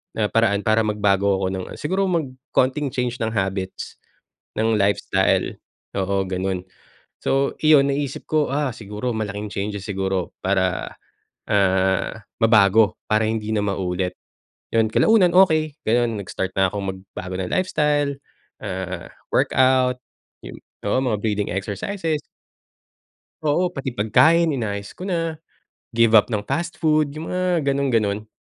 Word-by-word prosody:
na 105 -1 +1
paraan 110 -3 +3
para 110 +1 +3
magbago 100 -2 +1
ako 95 - -1
ng 95 - -4
siguro 190 +6 0 0.5
konting 140 +3 +2
change 125 -1 -2
ng 110 - -1
habits, 95 -1 -3 0.6
ng 110 0 +2
lifestyle, 100 +1 +1 0.4
oo 95 0 0
gano'n. 95 0 -2 0.6
So, 135 +1 +1
iyon, 150 -3 +6
naisip 140 -1 -3
ko 155 -2 +1
"Ah, 145 -3 0
siguro 105 +3 -4
malaking 105 -1 -3
changes 100 0 -4
siguro 95 -2 -2
para, 95 -1 0 0.6
ah, 95 +1 +2 0.2
mabago 105 -2 +5
para 110 +1 +2
hindi 110 -1 -2
na 105 - +1
maulit." 95 -2 -2 0.6
'Yon 110 -1 +3
kalaunan 195 - +4
okey 155 -5 +4
gano'n, 115 -1 +1
nag-start 95 0 -4
na 95 - +5
akong 100 -2 -4
magbago 95 -1 -8
ng 95 -1 -3
lifestyle, 150 -6 +1 0.5
ah, 95 -3 -5 0.2
workout 130 -1 +3 0.5
yung - - -8 0.3
oo 100 - +2
mga 115 -6 0
breathing 105 -2 -1
exercises. 150 - -3 1.2
Oo, 165 +5 +2
pati 140 -7 -5
pagkain 155 +9 +4
inayos 100 -4 -4
ko - - -9
na, 165 -4 -1 0.6
give 115 -1 +6
up - - +2
ng 105 -4 -2
fast 170 +10 -3
food 155 -2 +2
yung 155 +1 -6
mga 180 -3 0
ganong-ganon. 115 -7 0
110 Hz, 130 wpm, -22 LUFS, 100-145 Hz, 1.2 s, iyon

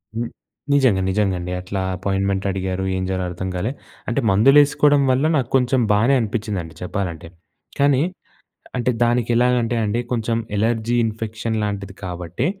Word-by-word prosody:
హ్మ్. 115 +1 -2 0.4
నిజంగా, 130 -9 +4
నిజంగాండి. 95 -3 0
అట్లా 95 +1 -4
అపోయిన్మెన్ట్ 95 +1 -1
అడిగారు. 95 0 -2
ఏం 95 - -2
జేయాలో 95 -1 -1
అర్థం 90 +2 -5
కాలే. 100 +7 -1 0.4
అంటే, 120 - 0
మందులేసుకోడం 145 +6 +5
వల్ల, 130 +4 +2
నాకు 125 -3 -1
కొంచెం 130 0 +3
బానే 110 +6 +3
అనిపిచిందండి 105 -7 -3
చెప్పాలంటే. 90 -3 -4 0.5
కానీ, 140 -1 +4 0.8
అంటే 125 0 +1
దానికెలాగంటే 120 0 +2
అండి, 105 +3 0
కొంచెం 115 -1 0 0.2
ఎలర్జీ 115 +2 +1
ఇన్ఫెక్షన్ 110 0 -3
లాంటిది 100 -2 -4
కాబట్టే, 90 - -3
110 Hz, 130 wpm, -21 LUFS, 95-120 Hz, 0.8 s, మందులేసుకోడం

